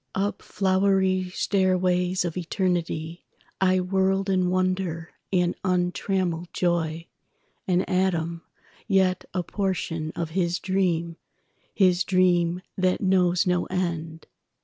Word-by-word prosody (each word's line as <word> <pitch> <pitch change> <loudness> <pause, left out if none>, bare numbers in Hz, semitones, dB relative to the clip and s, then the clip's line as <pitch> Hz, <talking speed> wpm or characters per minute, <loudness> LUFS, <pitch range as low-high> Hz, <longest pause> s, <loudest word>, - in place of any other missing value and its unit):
Up 200 +2 -1
flowery 190 -1 +1
stairways 185 -1 +1
of 170 - -2
eternityI 170 -2 -2 0.6
whirled 195 +1 +1
in 185 -1 +2
wonder 185 -3 -1 0.2
and 180 -2 +2
untrammeled 180 -1 0
joy, 165 -2 0 0.6
An 180 -1 +2
atom, 170 -3 0 0.5
yet 190 -3 +2
a 180 - 0
portion 170 -5 -2
of 165 -2 -3
His 175 0 0
dream—His 180 0 -1
dream 180 -2 +2
that 185 -1 +1
knows 180 -2 +3
no 180 -1 +1
end. 165 -3 -3
180 Hz, 100 wpm, -25 LUFS, 170-190 Hz, 0.6 s, knows